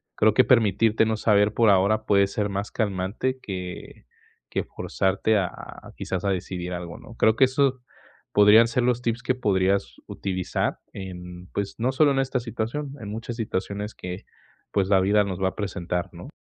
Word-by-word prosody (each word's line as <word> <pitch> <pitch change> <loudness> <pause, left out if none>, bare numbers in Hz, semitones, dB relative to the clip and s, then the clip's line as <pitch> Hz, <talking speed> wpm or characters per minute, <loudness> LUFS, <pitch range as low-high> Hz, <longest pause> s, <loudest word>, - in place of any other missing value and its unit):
Creo 110 0 +4
que 130 - +5
permitirte 110 -2 +3
no 110 0 0
saber, 105 -1 +3
por 115 -1 +4
ahora, 100 +3 +3
puede 100 -1 +4
ser 100 +1 -2
más 100 +1 -3
calmante 105 +5 -2
que 90 - -7 0.5
que - - -1
forzarte 100 +3 0
a, 90 -3 0 0.4
quizás, 95 0 -4
a 100 - +2
decidir 90 -1 -4
algo, 85 -1 -6
¿no? 115 - -13
Creo 110 -1 +3
que - - +4
eso, 130 0 +1 0.5
podrían 105 +3 +7
ser 120 +2 0
los 125 0 +1
tips 115 0 -1
que 130 - +1
podrías 100 -4 +1
utilizar 95 -2 -2
en, 90 -2 -8
pues, 100 -1 -3
no 125 +3 +1
solo 145 +2 +4
en 135 - +1
esta 135 -1 0
situación, 120 +5 -4
en 100 - -6
muchas 115 +2 -5
situaciones 105 -1 -3
que, 90 +1 -7 0.5
pues, 95 -2 +1
la 95 -2 +5
vida 105 +2 +3
nos 95 -2 -4
va 95 - +2
a - - -14
presentar, 90 -3 -3
¿no? - - -10
105 Hz, 180 wpm, -25 LUFS, 95-115 Hz, 0.5 s, podrían